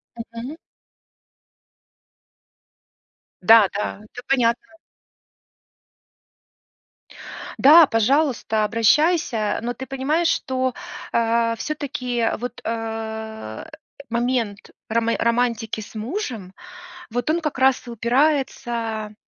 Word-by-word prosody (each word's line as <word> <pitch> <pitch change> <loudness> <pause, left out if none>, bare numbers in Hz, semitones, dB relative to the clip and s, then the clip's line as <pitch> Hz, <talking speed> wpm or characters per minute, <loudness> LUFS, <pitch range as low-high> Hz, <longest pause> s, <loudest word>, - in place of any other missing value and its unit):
Мгм. 230 +5 -7 2.8
Да-да, 205 0 +4
это 245 +3 -11
понятно. 250 +4 0 2.8
Да, 310 +3 +8
пожалуйста, 230 -2 +1
обращайся. 230 - +2
Но 240 +1 -2
ты 265 +1 -8
понимаешь, 280 +6 0
что, 260 -5 0 0.4
а, 230 0 +1
всё-таки, 250 -5 -2
вот, 245 +1 -6
э, 220 - -5 0.4
момент 235 -3 -1 0.2
роме 230 +1 +1
романтики 235 -2 0
с 215 - -12
мужем, 225 - -5 0.6
вот 245 +4 -2
он 335 +2 +1
как 305 -4 -3
раз 265 -1 +3
и - - -6
упирается 235 -3 0
235 Hz, 80 wpm, -22 LUFS, 225-265 Hz, 2.8 s, Да